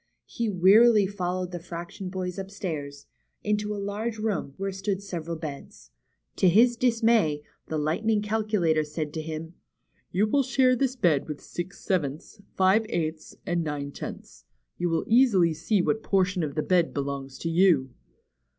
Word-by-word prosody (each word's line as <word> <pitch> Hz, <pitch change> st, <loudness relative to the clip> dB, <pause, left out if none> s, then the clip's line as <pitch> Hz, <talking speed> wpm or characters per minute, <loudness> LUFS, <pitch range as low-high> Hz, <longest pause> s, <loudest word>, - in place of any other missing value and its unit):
He 230 Hz, -2 st, -3 dB
wearily 205 Hz, +3 st, +6 dB
followed 185 Hz, -2 st, -3 dB
the 175 Hz, -, -5 dB
fraction 175 Hz, +3 st, -7 dB
boys 185 Hz, 0 st, -4 dB
upstairs, 160 Hz, -8 st, -5 dB, 0.4 s
into 210 Hz, 0 st, 0 dB
a 210 Hz, -, -3 dB
large 215 Hz, +3 st, -3 dB
room, 210 Hz, -10 st, -2 dB
where 195 Hz, 0 st, -2 dB
stood 195 Hz, +1 st, -3 dB
several 170 Hz, -4 st, -5 dB
beds. 140 Hz, -, -9 dB, 0.5 s
To 185 Hz, -, +5 dB
his 235 Hz, +7 st, +5 dB
dismay, 225 Hz, -11 st, +2 dB, 0.2 s
the 160 Hz, -, -2 dB
Lightning 205 Hz, +8 st, 0 dB
Calculator 210 Hz, -7 st, +1 dB
said 150 Hz, 0 st, -5 dB
to 160 Hz, -, -3 dB
him: 160 Hz, +1 st, -6 dB, 0.6 s
^^You 200 Hz, +4 st, +2 dB
will 285 Hz, -, +4 dB
share 260 Hz, -1 st, +3 dB
this 255 Hz, +1 st, 0 dB
bed 170 Hz, -, +2 dB
with 150 Hz, -2 st, -5 dB
Six 175 Hz, +2 st, -7 dB
Sevenths, 170 Hz, +3 st, -2 dB
Five 195 Hz, +4 st, +3 dB
Eighths, 160 Hz, -2 st, -3 dB
and 175 Hz, -1 st, 0 dB
Nine 145 Hz, -2 st, -4 dB
Tenths. -, -, -9 dB, 0.4 s
You 175 Hz, -, 0 dB
will 165 Hz, -1 st, 0 dB
easily 215 Hz, -9 st, +4 dB
see 175 Hz, +5 st, 0 dB
what 220 Hz, -, 0 dB
portion 185 Hz, -3 st, +1 dB
of 150 Hz, -3 st, -3 dB
the 155 Hz, -, 0 dB
bed 175 Hz, -3 st, +2 dB
belongs 140 Hz, -1 st, -4 dB
to 165 Hz, -, -3 dB
you." 165 Hz, -7 st, +3 dB
180 Hz, 160 wpm, -26 LUFS, 155-210 Hz, 0.6 s, wearily